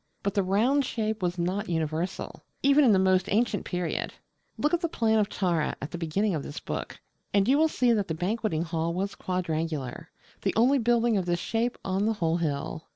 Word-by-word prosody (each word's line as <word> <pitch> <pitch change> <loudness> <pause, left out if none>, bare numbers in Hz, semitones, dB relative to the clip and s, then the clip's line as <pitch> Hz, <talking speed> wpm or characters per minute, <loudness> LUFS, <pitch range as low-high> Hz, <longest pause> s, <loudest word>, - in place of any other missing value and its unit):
But 200 - 0
the 200 - +2
round 225 +10 +2
shape 220 -4 -2
was 180 0 -1
not 185 +4 -1
universal, 160 +2 -3 0.2
even 280 +2 +5
in 245 - +6
the 195 - +5
most 185 -1 +2
ancient 215 0 +1
period. 180 -2 -3 0.4
Look 300 - 0
at 345 - +2
the 335 - 0
plan 220 -5 +2
of 210 - +1
Tara, 170 -5 0
at 145 - -6
the 175 - -4
beginning 190 +5 0
of 155 - -1
this 145 - -7
book, - - -5 0.4
and 200 -1 +4
you 265 - +5
will 315 +2 +4
see 250 -6 +2
that 205 -3 0
the 160 - -2
Banqueting 180 -1 -1
Hall 165 0 -2
was 195 +2 -2
quadrangular, 160 -7 -3 0.3
the - - -1
only 255 +6 +4
building 235 -1 +2
of 185 -2 -1
this 175 0 +1
shape 230 +6 -1
on 195 +2 0
the 225 - +2
whole 170 -5 0
hill. 155 0 -3
190 Hz, 210 wpm, -27 LUFS, 170-225 Hz, 0.4 s, in